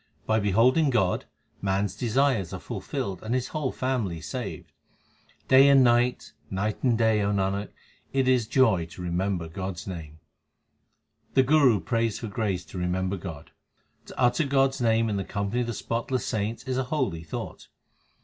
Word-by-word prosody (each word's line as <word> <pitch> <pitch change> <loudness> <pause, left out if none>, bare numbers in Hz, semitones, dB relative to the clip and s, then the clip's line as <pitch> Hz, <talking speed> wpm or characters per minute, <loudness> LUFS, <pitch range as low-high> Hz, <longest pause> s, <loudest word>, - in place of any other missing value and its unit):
By 110 0 +2
beholding 115 - +3
God, 95 -8 +1 0.4
man 95 0 +1
s - - -4
desires 120 - +1
are - - -4
fulfilled 95 -2 -5
and 115 +3 -2
his 125 -1 -1
whole 150 -4 -2
family 120 -10 -2
saved. 120 +6 -6 0.8
Day 135 +1 +7
and 135 -1 +7
night, 120 +1 +2 0.2
night 105 +3 -2
and 120 -4 +2
day, 110 -2 +3
O 100 0 +1
Nanak, 100 0 -1 0.4
it 135 -1 +1
is 125 -4 +3
joy 110 -10 +3
to 85 - -11
remember 90 0 -1
God 95 +3 -5
s 85 - -8
name. 80 -5 -7 1.2
The 130 - +6
Guru 135 -6 +4
prays 115 +4 -1
for 115 - -5
grace 100 -3 -2
to 90 - -7
remember 90 +2 -1
God: 80 -5 -8 0.6
To - - -10
utter 125 +5 +3
God 135 0 +3
s 135 0 -8
name 115 -1 +3
in 105 -2 -1
the 95 - -2
company 100 +5 -2
of 120 - -2
the 120 - -2
spotless 120 +3 -2
saints 110 +1 -2
is 130 -1 -2
a 130 - -1
holy 125 - -1
thought. 80 - -7
110 Hz, 175 wpm, -26 LUFS, 95-130 Hz, 1.2 s, Day